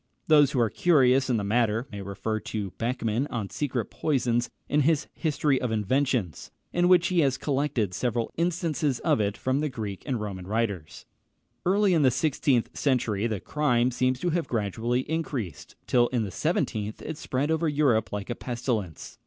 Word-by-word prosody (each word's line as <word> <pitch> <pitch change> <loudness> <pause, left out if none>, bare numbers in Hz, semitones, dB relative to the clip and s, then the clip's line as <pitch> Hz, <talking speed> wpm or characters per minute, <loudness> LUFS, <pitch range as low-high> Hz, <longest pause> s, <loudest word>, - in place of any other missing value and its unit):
Those 150 -3 +6
who 135 - -1
are 115 -3 +2
curious 135 -6 +3
in 120 - +2
the 105 - -1
matter 115 +3 +1
may 100 -1 -6
refer 100 +3 -3
to 105 -3 -4
Beckmann 120 +1 -1
on 105 -5 -4
secret 130 -6 -2
poisons, 120 -5 0 0.2
in 150 - +2
his 155 +1 +2
History 150 -4 0
of 125 - -1
Inventions, 110 - 0 0.2
in 175 0 +3
which 180 -1 +5
he 180 -2 +2
has 135 -4 +2
collected 135 -9 -1
several 120 +2 -1
instances 165 -5 0
of - - +2
it 100 0 -1
from 130 +2 0
the 150 0 0
Greek 105 -6 -5
and 130 -4 -1
Roman 95 -4 -5
writers. 100 -7 -3 0.6
Early 200 0 +3
in 165 - +3
the 135 - +5
sixteenth 130 -2 +1
century 115 -6 +1
the 110 -4 -2
crime 130 -3 +1
seems 130 +1 0
to 175 - 0
have 170 0 -1
gradually 115 +3 -1
increased, 140 - -4
till 120 -1 +3
in 120 -3 -1
the 100 - -5
seventeenth 115 - -2
it 160 - -4
spread 145 +1 -2
over 160 0 +1
Europe 135 -7 +2
like 105 +3 -4
a - - -2
pestilence. 115 - -4
125 Hz, 180 wpm, -27 LUFS, 110-145 Hz, 0.6 s, Those